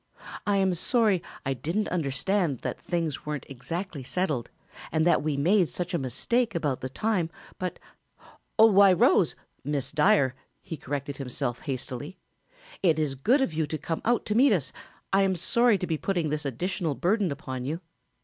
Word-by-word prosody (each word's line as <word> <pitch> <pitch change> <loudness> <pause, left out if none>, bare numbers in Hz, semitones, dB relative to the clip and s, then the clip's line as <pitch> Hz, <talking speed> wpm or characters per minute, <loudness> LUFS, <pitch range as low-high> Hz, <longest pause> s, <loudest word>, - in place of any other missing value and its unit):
I 205 -1 +3
am 190 -1 +2
sorry 210 0 +2 0.2
I 135 - +1
didn't 165 - -2
understand 155 - 0
that - - -4
things 165 -5 -2
weren't 150 -3 -4
exactly 165 +4 -5
settled 145 -3 -1 0.4
and 160 0 +2
that 175 - +4
we 150 -2 -1
made 175 +4 +3
such 180 +1 -4
a 170 - +1
mistake 210 - 0
about 145 -6 -1
the 130 - -4
time, 190 - 0 0.3
but 185 -1 -3 0.8
why, 200 -3 +7
Rose, 180 - +4 0.3
Miss 145 -1 -2
Dyer," 150 -4 +4 0.3
he 165 - -7
corrected 140 0 -4
himself 125 -2 -3
hastily, 140 +4 -5 0.6
"it 165 -5 +3
is 150 -3 0
good 235 - +2
of 230 -11 0
you 155 -1 0
to 155 - -3
come 160 +2 -3
out 240 0 +1
to 210 - -1
meet 250 +2 +5
us, 145 -9 -1 0.4
I 195 - +5
am 190 -1 +2
sorry 235 +6 +3
to 185 - -3
be 160 -3 -2
putting 175 -5 0
this 150 0 -2
additional 160 - -2
burden 195 +1 +1
upon 130 -3 -5
you." 155 +5 -2
165 Hz, 170 wpm, -27 LUFS, 140-195 Hz, 0.8 s, why